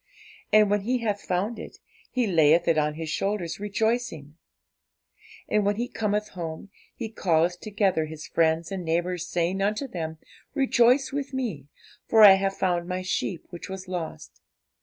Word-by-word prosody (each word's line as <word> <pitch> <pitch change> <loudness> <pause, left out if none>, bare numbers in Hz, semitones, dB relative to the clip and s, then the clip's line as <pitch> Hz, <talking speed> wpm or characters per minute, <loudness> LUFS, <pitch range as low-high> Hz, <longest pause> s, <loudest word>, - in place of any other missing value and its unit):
And 210 -1 +5
when 205 0 +2
he 245 +5 0
hath 205 -2 -1
found 195 +6 -2
it, - - -9 0.3
he 250 -2 0
layeth 165 -3 +4
it 165 - +4
on 150 -1 +1
his 160 0 -5
shoulders, 190 0 -2
rejoicing. 210 - -2 1.1
And 210 -1 +2
when 205 +1 +1
he 240 +3 -2
cometh 210 -2 -1
home, 170 +2 -7 0.2
he 230 - -4
calleth 175 -4 +1
together 200 -6 0
his 155 0 -8
friends 165 +1 +1
and 190 -2 -4
neighbours, 175 +1 -1
saying 180 +3 -1
unto 210 +7 0
them, 160 -7 -5 0.4
Rejoice 260 0 +3
with 280 -1 -3
me; 200 - -3 0.4
for 220 -1 +6
I 205 - +12
have 195 0 0
found 175 -2 0
my 185 0 -3
sheep 185 -1 -2
which 175 +2 -8
was 190 0 -7
lost. 175 -3 -6
190 Hz, 160 wpm, -26 LUFS, 165-215 Hz, 1.1 s, I